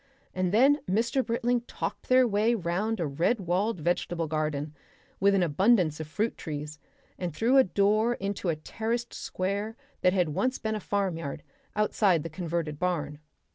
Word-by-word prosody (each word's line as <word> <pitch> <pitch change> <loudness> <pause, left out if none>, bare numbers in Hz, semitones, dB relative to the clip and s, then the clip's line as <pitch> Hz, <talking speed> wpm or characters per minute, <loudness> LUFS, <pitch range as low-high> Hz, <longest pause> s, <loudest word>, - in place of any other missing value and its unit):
And 185 -1 0
then 270 +8 +5
Mr. 235 +7 +1
Britling 235 +1 0
talked - - -5
their 255 0 +6
way 220 +2 +2
round 205 +4 -1
a 170 - 0
red 165 - +1
walled 185 +3 0
vegetable 170 +1 -1
garden 155 -1 -2 0.5
with 200 +1 +4
an 190 - +3
abundance 175 -1 +3
of 155 - -5
fruit 215 +8 -1
trees, 150 -1 -6 0.4
and 175 -4 -3
through 240 +9 +3
a 265 - +8
door 215 +4 +2
into 195 -3 -3
a 165 - +1
terraced 230 +9 -3
square 200 +4 -3 0.3
that 180 0 +4
had 180 -4 +2
once 255 - 0
been 220 -1 -2
a 215 - -2
farmyard, 185 -8 -2 0.3
outside 205 -5 +2
the 165 - -5
converted 165 -3 -3
barn. 150 -5 -1
190 Hz, 165 wpm, -28 LUFS, 165-225 Hz, 0.5 s, a